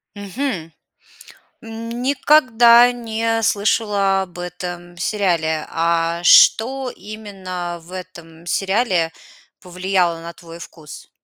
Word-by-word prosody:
Мгм. 200 - -5 0.9
Никогда 240 +1 +3
не 225 -1 -2
слышала 200 -2 +1
об 180 -1 -12
этом 175 0 -7
сериале. 170 -5 -1
А 170 0 0
что 255 +8 +5
именно 190 -5 -7
в 170 +2 -17
этом 170 -3 -11
сериале 190 -2 0 0.5
повлияло 180 -1 -1
на 170 +1 -8
твой 170 -1 -13
вкус? 160 -3 -12
190 Hz, 90 wpm, -19 LUFS, 170-225 Hz, 0.9 s, что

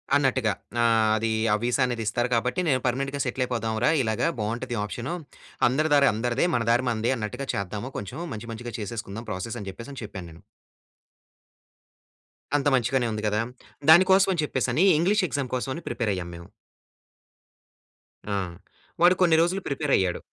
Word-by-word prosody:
అన్నట్టుగా. 130 -6 +2 0.3
ఆహ్, 110 -2 +3
అది 115 +1 -1 0.2
ఆ - - +5
విసా 120 +3 +1
అనేది 120 -2 -2
ఇస్తారు 120 +2 0
కాబట్టి, 125 +9 0
నేను 130 -4 +3
పర్మనెంట్‌గా 135 +3 -1
సెటిల్ 130 0 -1
అయిపోదాం 115 -3 -2
రా! - - +5
ఇలాగా 110 +5 0
బావుంటది 120 +3 -3
ఆప్షను. 120 - -4 0.5
అందరి 155 +4 0
దారి 140 -1 +5
అందరిదే. 120 +6 0
మన 120 - +1
దారి 120 +2 +2
మనదే 115 0 0
అన్నట్టుగా 115 +5 -5
చేద్దాము 100 +5 -4
కొంచెము 130 - -6
మంచి 110 +2 -7
మంచిగా 120 +1 -7
చేసేసుకుందాం 110 +1 -6
ప్రాసెసని 100 +1 -5
జెప్పేసని 125 +7 -9
చెప్పాను 95 -4 -7
నేను. 80 +1 -15 2.2
అంత 145 0 -1
మంచిగానే 125 0 +1
ఉంది 110 0 -4
కదా! 105 +1 +1 0.5
దాని 175 +4 +8
కోసమని 190 -3 +4
చెప్పేసని 130 +4 +1
ఇంగ్లీష్ 190 +4 +2
ఎగ్జామ్ 140 -3 -3
కోసమని 130 +6 -3
ప్రిపేర్ 115 -3 -1
అయ్యాము 90 -2 -5
మేము. 85 0 -11 1.9
ఆ! - - +1 0.6
వాడు 175 +1 +6
కొన్ని 170 -3 +5
రోజులు 185 +3 +1
ప్రిపేరయ్యాడు. 135 - +1
120 Hz, 150 wpm, -26 LUFS, 110-140 Hz, 2.2 s, దాని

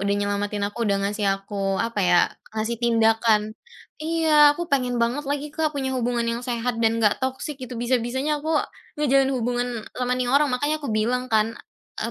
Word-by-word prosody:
udah 200 +1 0
nyelamatin 205 0 -2
aku, 230 +2 -4
udah 200 - +2
ngasih 205 0 -1
aku 195 0 -3
apa 230 -1 -1
ya, 180 -2 +4 0.4
ngasih 220 +2 -1
tindakan" 225 -2 +3 0.6
iya, 315 -2 +5
aku 345 0 -3
pengen 250 -5 0
banget 240 +5 0
lagi, 285 +1 -2
Kak, 315 -1 0
punya 265 -1 -2
hubungan 240 -1 0
yang 230 +1 -1
sehat 240 -1 -2
dan 225 0 +2
nggak 210 -2 +2
toksik 265 +2 -3
gitu, 250 0 -6
bisa-bisanya 260 +5 0
aku 315 -1 +1 0.4
ngejalin 275 -2 +3
hubungan 245 +1 -1 0.3
sama 250 0 -1
ini 250 - 0
orang, 280 +4 +3
makanya 290 +5 -1
aku 285 - -5
bilang 245 +4 0
kan, 220 +1 +2 0.5
a - - -2
245 Hz, 180 wpm, -24 LUFS, 220-275 Hz, 0.6 s, iya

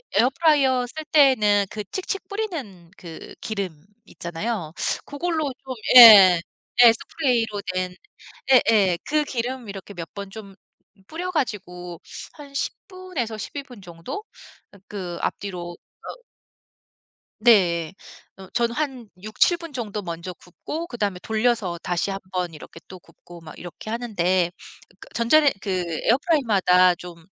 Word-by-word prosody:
에어프라이어 265 +2 +3
쓸 315 +5 -7
때에는 220 -9 +4
그 210 - -5
칙칙 390 +1 -4
뿌리는 280 - -6
그 165 -3 -10
기름 190 -8 -5 0.2
있잖아요. 170 0 -5 0.3
그걸로 310 -1 -2
좀 260 - -4 0.3
예 195 -7 +10 0.4
예 235 - +9
스프레이로 225 -4 -1
된 185 0 -3 0.6
예예. 210 -8 +4
그 300 0 +2
기름 250 -2 -4
이렇게 200 0 -9
몇 165 -1 -7
번 200 -1 -6
좀 200 -3 -11 0.5
뿌려가지고 210 - -4 0.3
한 285 -2 -13
10 - - -1
분에서 365 - -5
12 280 +6 -6
분 245 -7 -14
정도 175 - -8 0.6
그 180 -4 -6
앞뒤로 175 -3 -4 0.3
어 - - -6 1.2
네. 180 -7 +3 0.4
어 190 - -11
저는 235 -1 0
한 265 -7 -3
6-7 215 - +2
분 335 -3 -10
정도 215 -4 -4
먼저 170 0 -6
굽고 305 - -7
그다음에 205 -6 -3
돌려서 220 -5 0
다시 175 +2 -1
1 195 0 -3
번 180 -2 -2
이렇게 155 +2 -12
또 185 -1 -11
굽고 175 0 -16
막 155 -1 -12
이렇게 175 +4 -9
하는데 185 -7 0 0.5
그 - - -13
전자렌 280 +6 +4
그 205 - -6 0.3
에어프라이어마다 210 - +3
좀 170 -2 -12
215 Hz, 245 characters per minute, -23 LUFS, 180-265 Hz, 1.2 s, 예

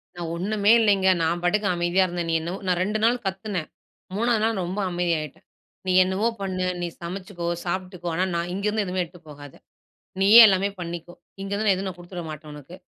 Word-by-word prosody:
நான் 170 -2 -5
ஒண்ணுமே 205 +4 +1
இல்லங்க, 200 -3 +3 0.2
நான் 170 +2 0
பாட்டுக்கு 200 +4 +1
அமைதியா 175 +2 +2
இருந்தேன். 175 -1 -4
நீ - - 0
என்னவோ 170 +4 -4
நான் 180 -1 +1
2 210 +3 -1
நாள் 235 +2 +4
கத்துனேன், 190 -3 -3 0.5
3ஆவது 230 0 +1
நாள் 225 -2 +1
ரொம்ப 180 +4 -4
அமைதியாய்ட்டேன். 170 -5 -2 0.4
நீ - - +2
என்னவோ 190 +4 0
பண்ணு, 185 -1 -2 0.2
நீ 175 - -1
சமைச்சுக்கோ, 180 0 -6 0.2
சாப்புட்டுக்கோ. 180 0 -4
ஆனா, 180 - +1
நான் 170 +1 -2
இங்கருந்து 210 +2 -1
எதுவுமே 185 0 -1
எடுத்துட்டு 175 -1 -14
போகாத. 145 -1 -11 0.7
நீயே 205 +4 +9
எல்லாமே 195 0 +2
பண்ணிக்கோ. 175 0 -6 0.3
இங்கருந்து 200 +2 -2
நான் 195 - +5
எதுவும் 190 +1 -3
நான் 180 - -9
குடுத்துடவிடமாட்டேன் 165 -4 -8
உனக்கு. 150 +4 -11
185 Hz, 175 wpm, -24 LUFS, 175-200 Hz, 0.7 s, நீயே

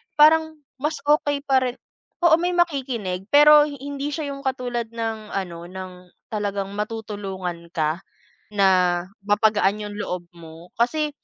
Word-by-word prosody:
parang 315 +1 +5 0.2
mas 300 +3 -2
okey 290 -1 +2
pa 270 -2 +3
rin 255 -1 -2 0.5
oo, 330 -1 +6
may 355 0 0
makikinig 250 - -1
pero 295 +2 +7
hindi 285 0 -5
siya 295 -3 -3
yung 275 - -7
katulad 245 -3 -2
ng 225 -2 -5
ano, 175 -3 -4
ng 185 0 -7 0.4
talagang 200 -2 -2
matutulungan 200 -5 -5
ka 155 +2 0 0.5
na 185 -3 +3 0.2
mapagaan 210 -1 +2
yung 205 - -8
loob 180 -4 -4
mo. 165 +1 -12
Kasi 300 +6 +1
220 Hz, 135 wpm, -23 LUFS, 190-285 Hz, 0.5 s, pero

